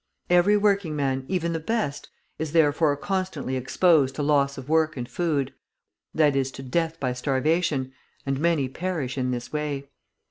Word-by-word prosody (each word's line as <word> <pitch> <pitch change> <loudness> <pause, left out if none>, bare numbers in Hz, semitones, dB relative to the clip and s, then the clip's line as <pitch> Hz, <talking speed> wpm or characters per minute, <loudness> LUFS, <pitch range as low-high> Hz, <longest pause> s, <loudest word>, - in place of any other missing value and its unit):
Every 180 +4 +5
working 200 -6 +1
man, 135 -2 -1
even 170 -3 -1
the 165 - -1
best, 160 -5 -2 0.3
is 155 -1 -3
therefore 150 -2 +3
constantly 185 -6 -2
exposed 135 +2 +3
to 150 - -2
loss 140 -1 +2
of 135 -1 -8
work 155 -1 +2
and 120 -1 -4
food, 150 -5 -1 0.6
that 150 -3 +3
is 135 -1 +1
to 135 - -8
death 165 +5 -1
by 130 -2 -1
starvation, 140 +2 0 0.3
and 135 -1 -1
many 160 -4 +2
perish 155 -2 -3
in 130 -2 -1
this 120 +1 -4
way. 145 -2 -3
150 Hz, 165 wpm, -25 LUFS, 135-170 Hz, 0.6 s, Every